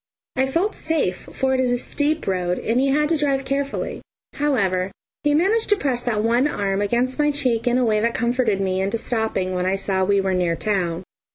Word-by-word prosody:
I 265 0 +2
felt 345 +10 0
safe, 295 - -2
for 265 0 0
it 260 - +1
is 255 -1 +2
a 245 - +2
steep 295 +5 -1
road, 180 -2 0
and 230 +3 0
he 275 - +2
had 300 +2 +2
to 330 - +2
drive 275 -2 0
carefully. 275 +1 -2 0.3
However, 195 -11 0 0.3
he 295 0 +2
managed 405 +8 +2
to 415 - +5
press 265 -10 -1
that 220 -4 -1
one 240 +5 +3
arm 200 -7 -1
against 240 +6 0
my 295 0 +3
cheek 255 -6 0
in 245 0 +3
a 255 - +2
way 215 -2 +2
that 230 +2 0
comforted 235 -3 +1
me 190 -1 0
into 195 +4 0
stopping 220 -5 -1
when 180 0 -1
I 190 - +2
saw 195 -1 0
we 200 +1 +3
were 190 -1 0
near 175 -2 +1
town. 180 -2 -1
235 Hz, 215 wpm, -22 LUFS, 195-275 Hz, 0.3 s, to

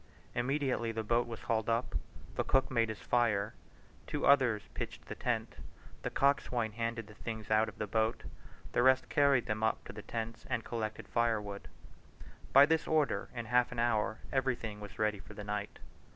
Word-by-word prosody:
Immediately 125 -2 0
the 110 0 -2
boat 120 +2 +2
was 115 -2 -7
hauled 110 -1 0
up, 115 +2 0 0.4
the - - 0
cook 135 0 +2
made 115 -3 +2
his 110 - -5
fire; 110 -3 +2 0.5
two - - -1
others 125 -7 +5
pitched - - -5
the - - -5
tent; - - -2 0.4
the - - -2
coxswain 125 -5 +1
handed 115 0 -3
the 105 - -13
things 110 0 -6
out 110 +1 +4
of - - -14
the 105 - -2
boat; 110 +2 0 0.5
the - - +2
rest 130 +1 +4
carried 140 -4 +4
them 110 0 -2
up 110 0 +1
to - - -8
the - - -7
tents 115 0 -5
and 115 - 0
collected 110 -2 -4
firewood. 110 -4 -1 0.8
By 140 +1 +9
this 160 +1 +1
order, 155 -3 +1
in 120 -1 -3
half 125 +2 +3
an 125 - -6
hour 110 -2 +1 0.2
everything 120 -5 -1
was 100 -1 -9
ready 105 -1 +1
for - - -12
the 105 - -6
night. 105 0 -4
115 Hz, 180 wpm, -33 LUFS, 110-125 Hz, 0.8 s, By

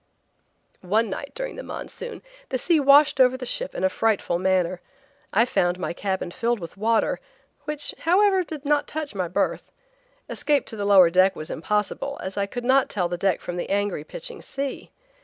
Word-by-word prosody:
One 210 +3 +1
night 280 +8 -5
during - - -5
the - - -5
monsoon 485 -1 -8 0.3
the 260 - 0
sea 325 +5 +2
washed 285 +1 +6
over 255 0 +5
the 255 - -6
ship - - -3
in - - -3
a - - +5
frightful 200 -3 0
manner. 185 -1 +1 0.5
I 225 +4 +4
found 175 -7 +1
my 180 - -3
cabin 190 -1 -3
filled 235 +2 -1
with 170 -3 -8
water, 220 +2 +1 0.5
which, 300 -1 -3
however, 380 +2 +3
did 310 -3 -8
not 295 0 +2
touch 310 -4 -4
my 185 -3 -2
berth. 175 - -1 0.6
Escape 290 -3 0
to - - -7
the 205 -2 -3
lower 190 -4 +7
deck 185 +2 +4
was 155 - -6
impossible, 210 - -2
as 190 0 -5
I 200 -1 -1
could 245 +4 -6
not 265 +1 +4
tell 180 -4 -1
the 175 - -2
deck 185 +1 0
from 175 - -5
the - - -4
angry, 200 -5 0
pitching - - -8
sea. 275 -1 -5
220 Hz, 190 wpm, -24 LUFS, 185-280 Hz, 0.6 s, lower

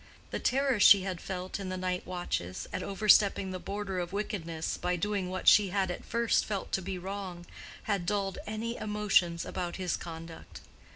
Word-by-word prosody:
The - - -2
terror 270 -3 +2
she 200 -1 +8
had 185 -3 -4
felt 185 0 -4
in 195 -2 -4
the 185 - -3
night 185 0 -2
watches 175 - -3
at - - -2
overstepping 200 -1 +4
the 185 - -4
border 195 -1 -4
of 175 0 -3
wickedness 175 -6 -3
by 180 0 -1
doing 200 0 -1
what 185 0 -5
she 210 -2 +8
had 190 -1 0
at - - -6
first 235 0 +1
felt 200 -3 -4
to 190 - 0
be 190 +1 -4
wrong, 185 -2 -6 0.4
had 200 -5 -1
dulled 200 -1 -1
any 225 +2 -3
emotions 210 -5 +1
about 175 -2 -4
his 185 -3 -1
conduct. 165 -1 -9
190 Hz, 180 wpm, -30 LUFS, 180-205 Hz, 0.4 s, she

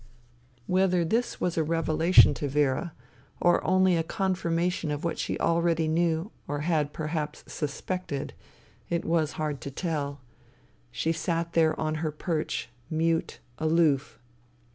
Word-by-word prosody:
Whether 180 0 +2
this 230 +8 0
was 170 -2 0
a - - +3
revelation 165 +2 +5
to 145 - -3
Vera, 145 +3 +1 0.5
or 175 0 +3
only 185 -1 +4
a 165 - +2
confirmation 175 -1 -1
of 145 0 -3
what 170 - -2
she - - -2
already 170 -1 +2
knew 165 +4 +1 0.2
or 145 0 -2
had 150 -2 +1
perhaps 155 -1 -4
suspected, 150 0 -4 0.6
it 170 -1 -1
was 160 -2 +1
hard 150 -4 -3
to 140 - -5
tell. 145 -2 -3 0.7
She 160 - -1
sat 165 +1 -2
there 160 -1 +3
on 155 0 0
her 155 -2 -1
perch, 155 +1 -2 0.2
mute, 165 +1 0 0.2
aloof. 155 -3 +2
165 Hz, 135 wpm, -27 LUFS, 150-170 Hz, 0.7 s, revelation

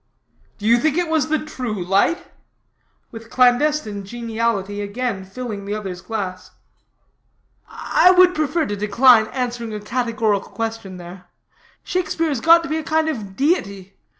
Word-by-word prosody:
"Do 210 - -8
you 235 +2 +5
think 310 +3 +1
it 350 -2 0
was 315 -4 +1
the 315 - +2
true 245 - -5
light?" 200 - +1 0.9
with 225 0 -11
clandestine 250 -4 +2
geniality 220 -2 -3
again 205 0 -3
filling 205 +1 -7
the 205 +1 -3
other's 190 -4 -6
glass. 185 -2 -5 1.2
"I 360 - +3
would 365 0 +6
prefer 310 +1 0
to 205 - -3
decline 220 +2 +4
answering 240 -3 -4
a - - -4
categorical 225 -2 -1
question 225 -5 -5
there. 180 +1 -11 0.6
Shakespeare 330 -3 -1
has 275 -6 -2
got 335 +3 +6
to 330 - -6
be 310 - -1
a 320 - -4
kind 315 0 +1
of 210 -10 -5
deity. 200 - -1
230 Hz, 150 wpm, -20 LUFS, 200-295 Hz, 1.2 s, would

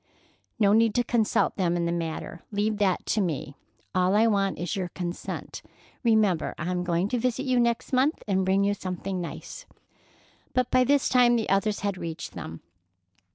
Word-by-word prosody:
"No 205 -3 +4
need 225 -1 +4
to 245 - +3
consult 235 -2 +1
them 175 -3 +1
in 170 - 0
the 170 - 0
matter. 165 0 -4
Leave 210 +1 0
that 190 -3 +1
to 215 - +1
me. 155 -6 -2 0.4
All 185 +2 +2
I 220 +2 +5
want 200 -3 +1
is 175 -2 -3
your 185 -2 -2
consent. 175 -1 -5 0.4
Remember 215 -7 +2
I 175 +3 -3
am 180 -1 -1
going 175 +1 0
to 245 - 0
visit 255 +3 -1
you 255 -2 +2
next 235 +2 0
month 270 +5 +2
and 190 -2 +1
bring 190 +1 +2
you 200 0 +2
something 185 -1 -4
nice." 170 - -8 0.9
But 255 -1 +1
by 255 0 +4
this 280 +1 +3
time 245 -1 +5
the 225 -2 -1
others 200 +2 +1
had 200 -2 -2
reached 165 -1 -5
them. 80 +1 -7
200 Hz, 185 wpm, -26 LUFS, 180-230 Hz, 0.9 s, I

